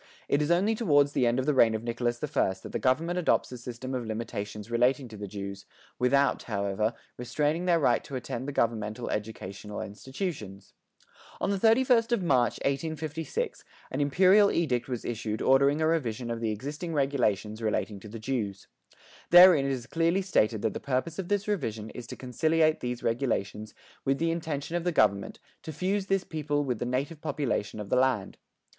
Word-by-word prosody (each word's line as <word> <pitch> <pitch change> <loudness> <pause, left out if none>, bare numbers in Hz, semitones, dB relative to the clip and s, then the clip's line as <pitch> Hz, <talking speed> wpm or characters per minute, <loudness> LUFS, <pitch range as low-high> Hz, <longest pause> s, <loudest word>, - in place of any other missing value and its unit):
It 145 - +2
is 150 - 0
only 185 +6 +3
toward 145 -11 +3
the 130 -3 +1
end 120 +1 +2
of 130 - 0
the 150 - +2
reign 115 -4 +5
of 110 - -4
Nicholas 120 +1 -2
I 135 -9 +1
that - - -8
the - - -2
government 165 +7 +1
adopts 175 - +1
a 125 - -6
system 125 +2 -6
of 125 -2 -2
limitations 110 -1 -5
relating 125 +3 +2
to 110 - -10
the 100 -1 -6
Jews, 100 0 -7 0.3
without, 140 +3 +3
however, 100 +1 -1 0.2
restraining 150 +8 -1
their 175 -2 +3
right 120 -6 +2
to 140 - -7
attend 125 +1 -4
the - - -2
governmental 115 -2 -1
educational 105 -1 -5
institutions. 110 - -6 0.7
On 195 - 0
the 200 - 0
31st 230 +1 +4
of 215 -6 +1
March, 125 -8 +3
1856, 155 +1 -3 0.3
an 135 - -1
imperial 185 +8 +5
edict 130 -8 0
was 125 -3 -4
issued 110 -2 -3
ordering 140 +3 +4
a 155 - +3
revision 125 -7 -1
of 115 0 -4
the 115 - 0
existing 145 - -5
regulations 115 -6 0
relating 105 -1 -1
to 105 - -11
the 115 - -7
Jews. 110 -4 -3 0.6
Therein 175 -5 +8
it - - 0
is 125 -3 -3
clearly 165 +6 +1
stated 110 - +1
that 110 -3 0
the - - -4
purpose 140 +6 -2
of 185 - -3
this 205 +1 0
revision 110 - -2
is 120 -2 -9
to - - -7
conciliate 155 +5 +1
these 125 -1 -4
regulations 110 -3 -2 0.3
with 135 0 +1
the 165 +2 +1
intention 160 -1 -3
of 175 - -1
the 175 - +1
government 105 - +2 0.2
to 160 - -7
fuse 190 +5 -1
this 195 -1 +1
people 150 -2 -2
with 125 -5 -2
the - - -2
native 140 +5 -2
population 120 -7 -2
of 105 -1 -6
the - - +2
land. 125 -6 +1
130 Hz, 190 wpm, -28 LUFS, 110-160 Hz, 0.7 s, Therein